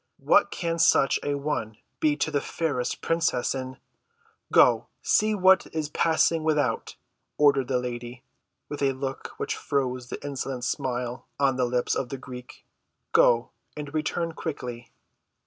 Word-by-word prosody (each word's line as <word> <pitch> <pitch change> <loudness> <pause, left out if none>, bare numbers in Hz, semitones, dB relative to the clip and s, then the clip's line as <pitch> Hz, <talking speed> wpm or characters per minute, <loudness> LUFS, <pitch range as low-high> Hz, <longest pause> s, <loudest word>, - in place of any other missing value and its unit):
What - - +4
can 170 -1 -3
such 150 -4 +4
an 145 -1 -2
one 110 -8 -2 0.2
be 150 -1 +3
to - - -1
the 145 - +1
fairest 145 -7 -2
princess 165 -7 +1
in—" 130 -1 -5 0.7
"Go, - - +5 0.2
see 215 0 +3
what 190 -1 +5
is 155 -2 -1
passing 160 +1 +2
without," 150 -7 0 0.4
ordered 140 -3 +4
the 130 - +1
lady, 120 0 -5 0.4
with 145 - -6
a 135 -1 +2
look 135 0 -5
which - - -2
froze 130 -3 -2
the - - -4
insolent 135 -2 -4
smile 125 -2 -3
on 135 -2 +3
the 125 -1 +1
lips 125 0 0
of 125 - -2
the 135 - -4
Greek. 125 -1 -11 0.5
"Go, 120 0 +4 0.3
and 145 0 -6
return 165 +2 -1
quickly." 125 -7 -6
135 Hz, 145 wpm, -26 LUFS, 125-155 Hz, 0.7 s, Go